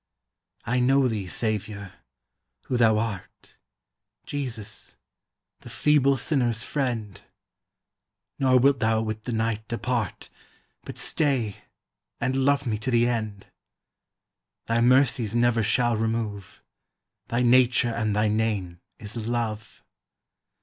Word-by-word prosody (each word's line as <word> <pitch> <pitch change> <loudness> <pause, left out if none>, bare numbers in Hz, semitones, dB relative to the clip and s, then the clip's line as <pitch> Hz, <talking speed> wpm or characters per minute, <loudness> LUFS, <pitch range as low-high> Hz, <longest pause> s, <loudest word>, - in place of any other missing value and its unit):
I 125 +2 +1
know 135 +2 +4
thee, 105 -5 -3
Saviour, 105 -1 -2 0.7
who 130 - -3
thou 115 -3 +4
art, 105 -4 -5 0.7
Jesus, 115 -7 -6 0.6
the - - -12
feeble 140 -2 +3
sinner's 120 -4 0
friend; 120 -9 -3 1.2
Nor 130 -1 +4
wilt 135 +1 +4
thou 110 0 +2
with 110 0 -5
the 125 - -3
night 110 -1 -1
depart, 120 -2 -3 0.5
But - - -8
stay 130 -9 0 0.6
and 130 - -1
love 140 +1 +2
me 110 -3 -1
to 110 - -3
the 120 -1 +3
end; 110 -4 -3 1.2
Thy 115 0 +1
mercies 125 -3 +3
never 120 -1 +3
shall 120 +2 +2
remove; 110 -3 -3 0.6
Thy 120 +2 0
nature 125 0 +4
and 110 -2 -1
thy 105 +1 +2
name 105 -5 -1 0.2
is 105 +1 -8
Love. 115 -3 -3
115 Hz, 115 wpm, -25 LUFS, 110-125 Hz, 1.2 s, know